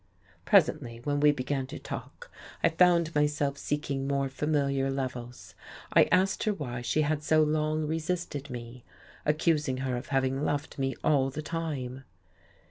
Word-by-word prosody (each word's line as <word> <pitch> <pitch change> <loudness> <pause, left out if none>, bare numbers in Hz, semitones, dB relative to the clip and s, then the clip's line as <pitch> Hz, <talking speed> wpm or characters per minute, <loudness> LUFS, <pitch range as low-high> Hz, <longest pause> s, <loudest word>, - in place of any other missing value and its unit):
Presently, 115 -1 +3
when 145 +1 0
we 150 0 +6
began 135 -1 -2
to 150 - -7
talk, 485 0 -8 0.3
I - - +6
found 170 -2 +3
myself 150 -1 +1
seeking 140 -2 -2
more 140 -1 0
familiar 140 -1 0
levels. 125 -8 -5 0.4
I - - +7
asked 185 +2 +2
her 215 - +2
why 125 -7 -5
she 155 +6 +1
had 150 0 0
so 155 +1 +4
long 155 0 0
resisted 160 -2 -3
me, 120 0 -8 0.4
accusing 150 -3 +2
her 130 -1 -1
of 120 +3 -5
having 135 0 0
loved 145 -1 -2
me 135 -1 0
all 140 -3 +3
the 155 +3 -6
time. 140 -6 -4
145 Hz, 150 wpm, -29 LUFS, 130-155 Hz, 0.4 s, I